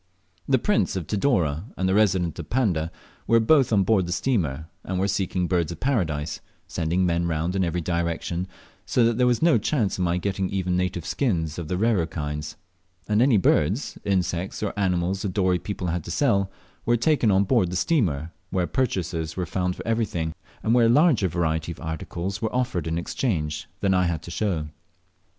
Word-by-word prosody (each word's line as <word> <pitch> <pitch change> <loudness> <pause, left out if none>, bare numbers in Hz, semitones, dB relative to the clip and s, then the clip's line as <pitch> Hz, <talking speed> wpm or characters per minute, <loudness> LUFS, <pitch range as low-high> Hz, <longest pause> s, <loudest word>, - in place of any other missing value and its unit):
The 130 - +5
Prince 205 - +1
of 90 -4 -3
Tidore 95 - +1
and 95 - 0
the 95 - +2
Resident 95 -6 +2
of 85 - -7
Panda 90 -11 0 0.4
were 115 - +5
both 130 +3 +4
on 100 -3 +4
board 95 -3 +2
the - - -4
steamer, 85 - 0 0.2
and 95 -1 -3
were 95 - +1
seeking 95 -2 0
Birds 85 -3 0
of 85 - -7
Paradise, 85 - -1 0.3
sending 85 +2 0
men 85 0 +1
round 85 +3 -1
in 95 - +2
every 85 0 -1
direction, 85 +1 -2 0.4
so 120 - +2
that 115 +1 +1
there 125 - +4
was 125 +3 +2
no 165 -8 +5
chance 110 -4 0
of - - +1
my 85 0 +1
getting 95 0 -1
even 90 -2 -1
native 90 -2 -1
skins 85 - -1
of 85 - -5
the 90 - -1
rarer 105 -5 +2
kinds; 75 -2 -4 0.5
and 105 +1 +2
any 125 -3 +5
birds, 95 - +1
insects, 95 -1 -1
or 105 - -1
animals 95 -1 0
the 100 - -1
Dorey 90 -1 +1
people 95 -3 -4
had 85 -1 -2
to - - -7
sell 100 -2 +2 0.3
were 120 0 +2
taken 140 -2 +2
on 95 0 +4
board 95 -2 +2
the 90 - -4
steamer, 90 - +1 0.2
where 95 -2 0
purchasers 90 - -2
were 90 - -1
found 90 +1 -1
for - - -9
everything, 105 -9 -1 0.3
and 110 - +2
where 120 -2 +5
a - - +3
larger 135 - +4
variety 80 -1 -1
of 85 - -9
articles 85 +4 -4
were 110 +1 -2
offered 100 -10 -1
in 80 0 -1
exchange 80 - -2
than 100 -1 +2
I 90 -1 +3
had 80 -2 -2
to 85 - -8
show. 85 -5 -1
90 Hz, 195 wpm, -25 LUFS, 85-110 Hz, 0.5 s, The